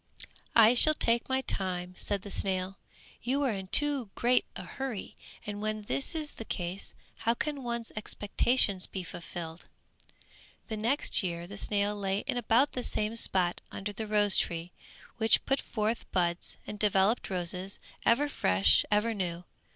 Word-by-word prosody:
"I 230 0 +7
shall 310 +5 +8
take 235 -3 +2
my 260 0 +1
time," 180 -6 -3
said 200 0 -2
the 200 - -9
snail, 190 0 0 0.4
"you 270 +4 0
are 265 - +1
in 190 -2 -5
too 280 -1 +5
great 245 +1 +3
a - - -6
hurry, 265 -7 -6 0.3
and 205 0 -5
when 215 0 -3
this 275 +9 -1
is 305 -2 -2
the - - -8
case, 180 -2 -4 0.2
how 230 +1 +1
can 290 +2 -3
one's 235 -2 -4
expectations 205 -1 +1
be 190 - -5
fulfilled?" 170 -1 -8 1.0
The 220 - -3
next 235 +7 +1
year 170 -3 -3
the 200 +3 -9
snail 205 0 0
lay 195 0 -1
in 270 - -3
about 245 +4 +3
the 250 - -4
same 215 -2 0
spot 185 -6 0
under 205 +1 -5
the 220 +1 -5
rose 205 -2 +5
tree, 170 +1 -1 0.5
which 225 -1 +2
put 270 0 +1
forth 220 +1 -3
buds 175 -1 -1
and 210 - -7
developed 205 +2 +2
roses, 185 +1 -3 0.3
ever 270 +6 +3
fresh, 95 - +3
ever 210 +2 +2
new. 180 -4 -3
210 Hz, 160 wpm, -30 LUFS, 185-235 Hz, 1.0 s, shall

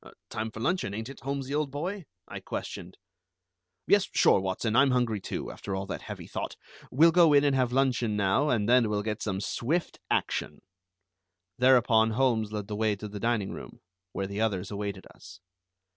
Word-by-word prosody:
"Time 110 +1 -3
for 110 - -10
luncheon, 120 - -1
ain't 110 +3 -5
it, 135 - -10
Holmesy, 140 +1 -4
old 150 -1 0
boy?" 170 +7 -4 0.2
I - - -7
questioned. - - -6 0.9
"Yes. 200 -1 +3
Sure, - - +4
Watson. 95 +4 -2
I'm 135 +2 +5
hungry, 120 -4 +1
too, - - -5
after 95 - -5
all 95 +1 -3
that 95 - -5
heavy - - -8
thought. - - -5 0.3
We'll 165 +6 +5
go 165 -2 +5
in 140 0 +6
and 140 -2 +2
have 130 -2 +1
luncheon 125 -4 +1
now, 100 +9 +2
and 110 -5 +1
then 120 -2 +4
we'll 105 -1 -1
get 110 0 -3
some 95 -3 -2
swift 145 - -2
action." - - -1 1.0
Thereupon 120 -3 +5
Holmes 115 -5 +2
led 105 -2 -4
the 105 - -4
way 110 -1 +1
to 105 +2 -7
the 105 0 -7
dining 115 -4 0
room, - - -9 0.3
where 100 - -3
the 100 +2 -4
others 100 -4 -1
awaited 100 -1 -4
us. 90 0 -14
115 Hz, 185 wpm, -28 LUFS, 105-135 Hz, 1.0 s, in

